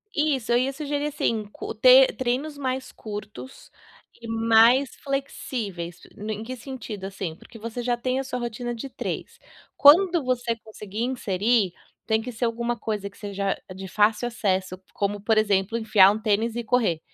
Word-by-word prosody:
Isso. 285 -6 0
Eu 240 - +5
ia 260 +2 0
sugerir 290 0 -2
assim, 230 -7 -1
co - - -6
te 255 +4 +8
treinos 260 +4 -2
mais 260 -1 -3
curtos 215 +4 -9 0.5
e 230 - -8
mais 230 +3 +4
flexíveis 215 -10 -4 0.2
no 210 +1 -5
em 215 +1 -4
que 255 +3 -6
sentido, 240 -6 -7
assim. 190 -4 -5
Porque 230 +7 -14
você 230 +2 -5
já 240 0 0
tem 255 +2 -1
a - - -2
sua 255 -1 -4
rotina 240 0 -4
de 250 +4 -6
3, - - -5 0.4
quando 340 +3 +6
você 245 -2 0
conseguir 215 -1 -7
inserir 220 -4 +1 0.3
tem 220 0 +1
que 250 +2 -7
ser 230 - -5
alguma 235 +1 -1
coisa 210 -3 -3
que 200 - -22
seja 200 -2 -2 0.2
de 190 +1 -8
fácil 210 +4 +2
acesso, 190 -5 -1 0.2
como 205 0 -2
por 220 +2 +2
exemplo 205 0 +2
enfiar 215 -4 +6
um 210 - -3
tênis 220 +1 +1
e 240 - -2
correr 225 -8 +1
230 Hz, 170 wpm, -25 LUFS, 210-255 Hz, 0.5 s, te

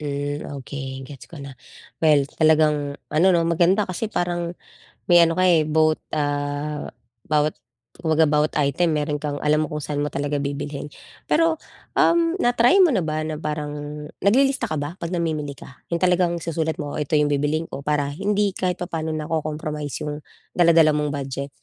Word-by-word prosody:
Hmm, 145 0 -3 0.2
okey 135 -1 -6
gets 135 0 -11
ko 160 -4 -10
na. 135 -3 -10 0.4
Well 150 -3 +4 0.2
talagang 150 -2 +3 0.2
ano 155 +4 +3
'no 170 - +3
maganda 170 +4 +3
kasi 185 +3 -3
parang 175 -3 -2 0.5
may 175 -1 +7
ano 165 - +1
ka, 185 +2 +1
eh, 165 -3 +4
both, 155 0 +3 0.2
ah, 145 0 -2 0.4
bawat 150 0 +1 0.4
kumbaga 160 -2 +2
bawat 150 +1 +2
item 150 +4 +1
meron 150 -1 -1
kang 145 -1 -3
alam 150 +1 +2
mo 150 - -7
kung 150 - -3
sa'n 145 -1 -2
mo - - -1
talaga 145 +1 -1
bibilhin. 140 +1 -4 0.4
Pero, 325 0 +2 0.3
um, 335 -1 +3
na 245 0 +2
try 245 +12 +5
mo 365 - +7
na 190 -8 +1
ba 155 0 -2
na 155 0 -3
parang 150 -1 -3 0.5
naglilista 270 +7 +3
ka 155 - -2
ba 150 +5 -5
'pag 170 - -3
namimili 155 -4 -2
ka? 125 - -14
'Yung 170 0 -2
talagang 180 -1 +2
isusulat 160 -1 -2
mo, 145 - -5
"Oh - - -2
ito 150 +1 0
'yong 150 -1 +2
bibilhin 145 +3 0
ko," - - -6
para 145 0 -1
hindi 200 +4 0
kahit 180 -1 -1
papa'no 160 -3 -3
nako-compromise 150 -1 -3
'yung 150 0 -4 0.3
dala-dala 165 -3 +5
mong 150 0 0
budget. 140 -1 -4
155 Hz, 180 wpm, -23 LUFS, 145-170 Hz, 0.5 s, may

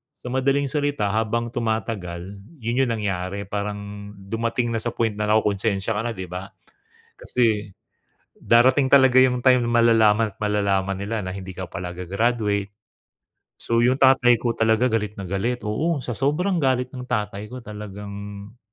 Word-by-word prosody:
sa 125 - -9
madaling 135 +1 +1
salita, 145 -8 0
habang 115 +2 0
tumatagal 100 -5 -3 0.2
'yun 120 +4 0
'yung 120 - -2
nangyari 100 -2 -3
parang 100 0 -5
dumating 115 +4 -2
na 115 - 0
sa 120 - -2
point 115 -2 +1
na 105 - -2
nakukonsensya 105 -1 +1
ka 105 - 0
na 120 - -1
'di 95 - -5
ba, 90 +2 -5 0.7
kasi 110 -5 0 0.7
darating 130 +4 +4
talaga 130 -2 +6
'yung 125 -1 +3
time 125 -2 +5
malalaman 115 -2 +4
at - - -39
malalaman 100 -2 +1
nila 105 +2 -3
na 95 - -4
hindi 95 -1 -7
ka 95 - -4
pala 90 - -5
ga-graduate. 100 +2 -1 0.9
So 115 0 0
'yung 125 +2 +4
tatay 130 -2 +6
ko 120 - +1
talaga 115 +2 +2
galit 105 -2 -1
na 100 - -7
galit, 115 +7 -2
oo 140 +8 -1
sa 120 - -4
sobrang 175 +7 +1
galit 130 -2 +1
ng 125 -1 -7
tatay 105 -2 -3
ko 125 +2 -8
talagang 105 0 -8
110 Hz, 155 wpm, -23 LUFS, 100-125 Hz, 0.9 s, talaga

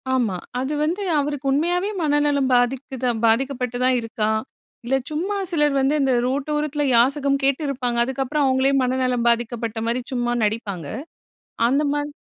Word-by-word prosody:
ஆமா, 220 -8 0 0.2
அது 275 +3 -2
வந்து 350 +6 -2 0.2
அவருக்கு 290 -1 -3
உண்மையாவே 350 +7 +1
மனநலம் 290 -3 +2
பாதித்துதா 255 +1 0 0.2
பாதிக்கப்பட்டு 250 +1 0
தான் 255 -1 +3
இருக்கா. 220 -1 -2 0.6
இல்ல, 265 - +1
சும்மா 355 +7 -2 0.2
சிலர் 295 -4 +2
வந்து 270 +3 +2
இந்த 265 -1 +2
ரோட்டோரத்துல 295 +2 -1
யாசகம் 275 +3 +3
கேட்டு 275 +2 +2
இருப்பாங்க, 250 -3 -2
அதுக்கப்புறம் 270 +3 -1
அவுங்களே 260 +1 +2
மனநலம் 255 -1 0
பாதிக்கப்பட்ட 235 -1 -1
மாரி 240 +2 0
சும்மா 240 -1 0
நடிப்பாங்க 205 -7 -2 0.8
அந்த 275 +4 +2
மாதி 290 0 -2
265 Hz, 135 wpm, -22 LUFS, 245-290 Hz, 0.8 s, தான்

